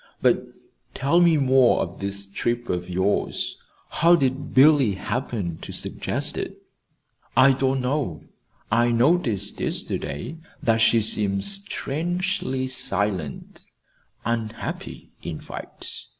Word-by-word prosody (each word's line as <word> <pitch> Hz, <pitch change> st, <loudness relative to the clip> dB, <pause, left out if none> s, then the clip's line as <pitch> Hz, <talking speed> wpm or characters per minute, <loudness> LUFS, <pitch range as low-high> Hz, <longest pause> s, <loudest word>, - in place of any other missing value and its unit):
But -, -, +3 dB, 0.5 s
tell 145 Hz, +6 st, +3 dB
me 170 Hz, -2 st, +5 dB
more 130 Hz, -3 st, +4 dB
of 85 Hz, -, -5 dB
this 100 Hz, 0 st, -3 dB
trip 120 Hz, +4 st, -2 dB
of 90 Hz, 0 st, -2 dB
yours. 95 Hz, +3 st, 0 dB, 0.4 s
How 170 Hz, +2 st, +5 dB
did 135 Hz, -1 st, -1 dB
Billy 135 Hz, -6 st, +5 dB
happen 100 Hz, -, -3 dB
to -, -, -7 dB
suggest -, -, -3 dB
it?" -, -, -5 dB, 0.8 s
"I 135 Hz, +2 st, +7 dB
don't 135 Hz, 0 st, +1 dB
know. 125 Hz, -, -2 dB, 0.5 s
I 120 Hz, +2 st, +3 dB
noticed 120 Hz, -, +2 dB
yesterday 70 Hz, -, -3 dB, 0.3 s
that 115 Hz, -1 st, +3 dB
she 115 Hz, -1 st, +4 dB
seemed 100 Hz, -2 st, +1 dB
strangely 175 Hz, -7 st, -1 dB
silent 100 Hz, -, -2 dB, 0.6 s
unhappy, 115 Hz, -1 st, -4 dB
in -, -, -5 dB
fact. -, -, -7 dB
120 Hz, 110 wpm, -24 LUFS, 100-140 Hz, 0.8 s, I